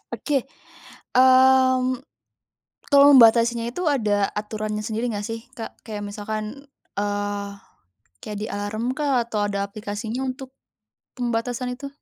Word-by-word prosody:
Oke. 280 Hz, -4 st, -1 dB, 0.7 s
Mmm, 260 Hz, 0 st, +5 dB, 0.9 s
kalau 280 Hz, -1 st, +7 dB
membatasinya 235 Hz, -1 st, +6 dB
itu 355 Hz, +8 st, -4 dB
ada 210 Hz, -9 st, +2 dB
aturannya 210 Hz, 0 st, -3 dB
sendiri 225 Hz, +2 st, -2 dB
nggak 205 Hz, -1 st, -4 dB
sih, 225 Hz, 0 st, -5 dB, 0.2 s
Kak? 225 Hz, -, -8 dB
Kayak 210 Hz, -2 st, -5 dB
misalkan, 215 Hz, +6 st, -6 dB, 0.3 s
eee, 205 Hz, 0 st, -2 dB, 0.7 s
kayak 210 Hz, -1 st, -6 dB
di 215 Hz, -, -3 dB
alarm 215 Hz, +4 st, -3 dB
kah 280 Hz, -5 st, +2 dB
atau 210 Hz, -3 st, -1 dB
ada 200 Hz, -1 st, -2 dB
aplikasinya 210 Hz, +3 st, -5 dB
untuk 260 Hz, 0 st, -6 dB, 0.7 s
pembatasan 245 Hz, +1 st, -2 dB
itu? 280 Hz, +2 st, -7 dB
230 Hz, 120 wpm, -23 LUFS, 210-255 Hz, 0.9 s, kalau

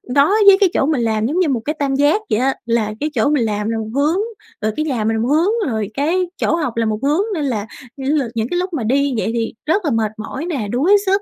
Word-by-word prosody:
đó 280 Hz, +1 st, +5 dB, 0.2 s
với 395 Hz, -1 st, +9 dB
cái 390 Hz, -3 st, +4 dB
chỗ -, -, +2 dB
mình 295 Hz, -4 st, +1 dB
làm 220 Hz, -1 st, 0 dB
giống 305 Hz, +9 st, 0 dB
như 355 Hz, -5 st, +2 dB
một 245 Hz, -4 st, 0 dB
cái 300 Hz, -, -1 dB
tam 275 Hz, -2 st, 0 dB
giác 290 Hz, +9 st, +3 dB
vậy 215 Hz, -, +1 dB
á, 265 Hz, +2 st, +1 dB
là 230 Hz, -2 st, 0 dB
cái 300 Hz, -, -1 dB
chỗ 285 Hz, -, +2 dB
mình 290 Hz, -5 st, +2 dB
làm 210 Hz, 0 st, -2 dB
là 225 Hz, -, -1 dB
một 220 Hz, -1 st, -4 dB
hướng, 300 Hz, +6 st, +2 dB, 0.4 s
rồi 215 Hz, -, 0 dB
cái 310 Hz, -, -1 dB
nhà 255 Hz, -8 st, -1 dB
mình 225 Hz, +1 st, +1 dB
là 220 Hz, -, -1 dB
một 235 Hz, -, 0 dB
hướng, 350 Hz, -, +1 dB
rồi 215 Hz, -3 st, -2 dB
cái 335 Hz, +8 st, +1 dB
chỗ -, -, +1 dB
học 295 Hz, -9 st, -3 dB
là 230 Hz, -, +1 dB
một 215 Hz, -1 st, -1 dB
hướng, 295 Hz, +6 st, +2 dB
nên 315 Hz, -6 st, -2 dB
là 220 Hz, -6 st, -2 dB, 0.3 s
nh 270 Hz, -, -7 dB
lần 250 Hz, -6 st, -1 dB
những 225 Hz, 0 st, -1 dB
cái 350 Hz, -, 0 dB
lúc 365 Hz, 0 st, -3 dB
mà 280 Hz, -8 st, -2 dB
đi 275 Hz, +4 st, +1 dB
vậy 220 Hz, -, -1 dB
thì 230 Hz, -1 st, -2 dB
rất 365 Hz, +5 st, +1 dB
là 295 Hz, -, +1 dB
mệt 220 Hz, -3 st, 0 dB
mỏi 265 Hz, +8 st, -5 dB
nè, 280 Hz, -12 st, -3 dB
đuối 325 Hz, +12 st, +4 dB
sức 390 Hz, +1 st, +2 dB
275 Hz, 290 wpm, -18 LUFS, 225-315 Hz, 0.4 s, với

